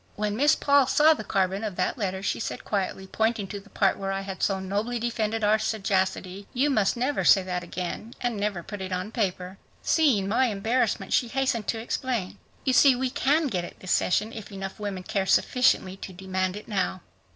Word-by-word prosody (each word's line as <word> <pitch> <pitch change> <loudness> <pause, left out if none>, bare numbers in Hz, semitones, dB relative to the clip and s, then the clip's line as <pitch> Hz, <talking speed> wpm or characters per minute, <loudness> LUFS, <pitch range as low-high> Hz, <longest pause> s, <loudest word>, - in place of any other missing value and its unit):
When 210 0 -1
Miss 290 +6 +4
Paul 280 -2 +4
saw 300 +4 +5
the 295 - -6
carbon 195 0 0
of 210 -4 -3
that 180 - 0
letter 190 -4 -3
she - - -1
said - - -5
quietly, 190 -1 -2
pointing 220 +1 0
to 205 - -5
the 200 +1 -18
part 195 -1 +1
where 195 0 -2
I 195 0 -2
had 195 -1 -7
so 195 -1 +1
nobly 205 +6 -2
defended 225 -2 -1
our 215 +1 +4
sagacity, 195 -2 -1
"You 280 +4 +2
must 215 -2 +2
never 260 +4 0
say 195 - +6
that 180 -1 -3
again 180 +6 -6
and 240 -2 -1
never 200 -4 -2
put 205 +2 -7
it 190 0 -5
on 185 +3 -3
paper." 190 -4 -2 0.2
Seeing 260 - +3
my 235 +5 +3
embarrassment, 225 +2 0
she 245 - +3
hastened 240 -4 -1
to 225 - -1
explain. 235 -3 -3 0.2
"You 260 - +1
see, 265 0 +6
we 255 0 -1
can 300 +5 +2
get 190 -10 -1
it - - -10
this 185 - -5
session 215 +5 +1
if 220 -2 -8
enough 195 0 -6
women 200 -3 -4
care 195 -1 -1
sufficiently 195 -7 +2
to 195 - -8
demand 185 0 -2
it 210 - -9
now." 190 -3 -1
205 Hz, 205 wpm, -26 LUFS, 190-235 Hz, 0.2 s, say